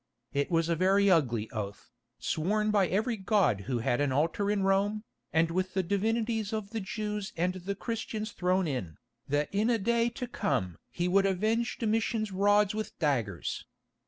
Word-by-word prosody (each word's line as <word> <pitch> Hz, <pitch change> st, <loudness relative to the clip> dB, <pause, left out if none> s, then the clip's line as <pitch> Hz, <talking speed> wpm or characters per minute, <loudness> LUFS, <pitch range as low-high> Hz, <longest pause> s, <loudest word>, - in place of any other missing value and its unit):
It 140 Hz, 0 st, 0 dB
was 165 Hz, -2 st, +2 dB
a 170 Hz, -, +1 dB
very 195 Hz, +3 st, +4 dB
ugly 120 Hz, -10 st, +2 dB
oath, 105 Hz, -1 st, -6 dB, 0.3 s
sworn 210 Hz, +6 st, 0 dB
by 200 Hz, -3 st, +3 dB
every 220 Hz, +6 st, 0 dB
god 190 Hz, -, +2 dB
who 125 Hz, -, +1 dB
had 120 Hz, +3 st, 0 dB
an 145 Hz, -2 st, +1 dB
altar 165 Hz, +9 st, +1 dB
in 205 Hz, -2 st, +1 dB
Rome, 200 Hz, +2 st, +1 dB, 0.3 s
with 170 Hz, +4 st, +1 dB
the 190 Hz, -, +2 dB
divinities 220 Hz, +3 st, 0 dB
of 215 Hz, -2 st, -3 dB
the 225 Hz, -, -2 dB
Jews 210 Hz, 0 st, -4 dB
and 180 Hz, +2 st, +1 dB
the 190 Hz, +2 st, -4 dB
Christians 220 Hz, 0 st, -4 dB
thrown 185 Hz, -1 st, +1 dB
in, 110 Hz, -, -4 dB, 0.3 s
that 145 Hz, +1 st, +1 dB
in 210 Hz, +4 st, +2 dB
a 235 Hz, -, +3 dB
day 235 Hz, +3 st, +2 dB
to 250 Hz, +2 st, -5 dB
come 125 Hz, -, -2 dB
he 175 Hz, -, -2 dB
would 195 Hz, +2 st, +4 dB
avenge 220 Hz, +5 st, 0 dB
Domitian's 220 Hz, -1 st, 0 dB
rods 205 Hz, +1 st, +3 dB
with 215 Hz, 0 st, -5 dB
daggers. 115 Hz, -, -1 dB
195 Hz, 170 wpm, -30 LUFS, 165-215 Hz, 0.3 s, very